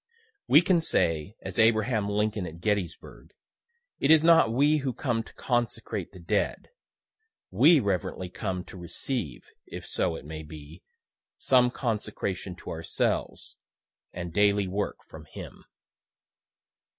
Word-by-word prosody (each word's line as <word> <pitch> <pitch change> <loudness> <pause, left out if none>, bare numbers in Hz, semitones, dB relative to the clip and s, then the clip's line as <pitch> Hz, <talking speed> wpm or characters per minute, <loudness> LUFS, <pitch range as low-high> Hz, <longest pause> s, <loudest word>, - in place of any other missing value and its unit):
We 155 - +7
can 175 -2 +3
say, 80 - +1
as - - -5
Abraham 110 -1 +3
Lincoln 105 -2 -1
at 80 +1 -10
Gettysburg, 100 -3 -3 0.6
It 140 - +1
is 160 -1 +7
not 165 -9 +6
we 145 +6 +3
who 135 -3 -2
come 120 -4 -1
to - - -14
consecrate 120 -2 -2
the - - -13
dead 85 - -1 0.8
we 170 -3 +6
reverently 95 -3 -2
come 90 0 -4
to 95 - -12
receive, 85 - -4 0.2
if - - -8
so 80 - 0
it 80 - -9
may 80 +1 -6
be, 75 +2 -11 0.6
some 125 -2 +4
consecration 105 -6 -3
to - - -6
ourselves 80 -1 -2 0.5
and 85 -2 -6
daily 100 0 +3
work 100 +2 -3
from - - -12
him. - - -11
105 Hz, 130 wpm, -27 LUFS, 90-125 Hz, 0.8 s, We